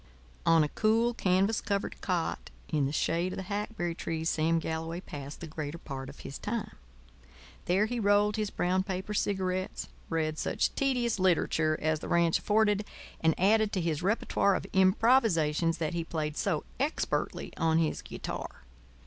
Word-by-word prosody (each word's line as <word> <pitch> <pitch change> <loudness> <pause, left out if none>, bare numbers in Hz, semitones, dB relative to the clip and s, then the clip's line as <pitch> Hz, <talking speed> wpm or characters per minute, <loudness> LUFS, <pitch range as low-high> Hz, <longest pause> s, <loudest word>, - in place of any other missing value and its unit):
On 165 -1 +6
a 150 - -1
cool, 225 +5 +2
canvas 195 +1 +2
covered 200 -1 -2
cot 180 -4 -2 0.2
in 145 -3 +1
the - - -3
shade 170 +4 0
of - - -6
the 190 - -3
hackberry 200 -3 -3
trees 165 -1 -2
Sam 160 +1 +2
Galloway 165 +1 -3
passed 145 -5 -8
the - - -4
greater 155 0 -5
part 135 -4 -7
of 140 - -11
his 135 - -7
time. 225 +1 -3 0.9
There 190 +4 +3
he 240 +2 -2
rolled 205 0 +3
his 215 -2 -1
brown 185 0 +1
paper 190 +2 -4
cigarettes, 185 -2 -1 0.2
read 155 -1 -1
such - - 0
tedious 250 -5 0
literature 160 -3 +2
as 155 0 0
the - - -7
ranch 170 -1 +3
afforded, 210 -1 +2 0.4
and 160 -1 +2
added 215 +3 +4
to 190 - +1
his 165 -2 -1
repertoire 200 0 +2
of - - -3
improvisations 185 - +3
that 160 0 -2
he 170 -1 -1
played 155 -2 -3
so 165 -5 0 0.2
expertly 285 +4 -1
on 160 -1 +2
his 165 -2 +1
guitar. - - -6
180 Hz, 165 wpm, -30 LUFS, 160-205 Hz, 0.9 s, On